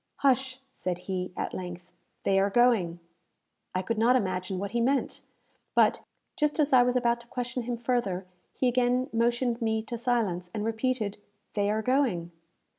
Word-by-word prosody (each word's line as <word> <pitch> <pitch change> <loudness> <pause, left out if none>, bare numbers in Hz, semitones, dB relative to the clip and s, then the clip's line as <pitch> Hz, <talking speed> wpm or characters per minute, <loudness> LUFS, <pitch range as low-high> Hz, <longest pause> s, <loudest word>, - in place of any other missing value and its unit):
"Hush!" 265 -1 +2
said 180 -7 -3
he, 185 -1 -3
at - - -3
length. 180 -1 -7 0.3
"They 195 0 +3
are 195 +1 +3
going." 200 -7 +3 0.8
I 185 - 0
could 225 +3 -2
not 240 +3 +5
imagine 185 -4 -1
what 200 +2 -3
he 235 - 0
meant; 270 +3 0 0.5
but, - - +4 0.4
just 300 0 0
as 295 -2 +2
I 255 - +8
was 250 +1 +2
about 240 -1 +2
to 235 - -16
question 245 0 -3
him 240 0 -3
further, 230 -6 -1 0.3
he 255 - +1
again 250 +1 +2
motioned 240 +1 +1
me 220 -1 0
to 235 +1 -5
silence, 215 -8 0
and 210 0 -2
repeated, 225 -2 -1 0.3
"They 205 -1 +1
are 215 +1 0
going." 235 -10 +1
230 Hz, 170 wpm, -28 LUFS, 195-250 Hz, 0.8 s, I